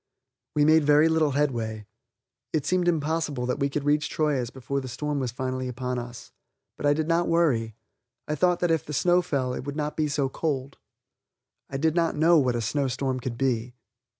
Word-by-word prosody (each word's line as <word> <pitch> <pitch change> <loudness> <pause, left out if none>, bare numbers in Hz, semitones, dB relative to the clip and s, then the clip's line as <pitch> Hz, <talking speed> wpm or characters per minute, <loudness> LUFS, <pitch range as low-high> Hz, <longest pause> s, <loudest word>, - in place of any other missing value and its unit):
We 150 -1 +4
made 155 0 +5
little 155 0 +4
headway. 115 -7 -1 0.7
It 155 -4 0
seemed 180 -1 +1
impossible 155 -5 0
that 125 +3 -2
we 140 0 +1
could 140 0 -3
reach 150 +1 +1
Troyes 145 -6 0
before 135 +2 -4
the 130 - -7
storm 150 +3 -3
was 130 -3 -2
fully 130 +1 -3
upon 125 0 -3
us. 120 -1 -9 0.4
But 145 - -2
I 145 - +4
did 155 0 -1
not 170 +1 +2
worry; 125 -10 +1 0.5
I 150 - -1
thought 180 +3 +2
that 175 -1 +2
if 160 -2 +1
the 150 - -7
snow 175 +5 +3
fell 140 -8 -1
it - - -5
would 145 0 -5
not 150 0 -2
be 155 -1 +1
so 140 -1 0
cold. 140 -1 -3 0.9
I 135 - -3
did 160 +2 +1
not 165 -1 +1
know 165 +2 +5
what 125 -3 +1
a 120 - -1
snow 140 +5 0
storm 130 0 -2
could 120 -1 -5
be. 125 -2 -1
145 Hz, 200 wpm, -26 LUFS, 130-155 Hz, 0.9 s, made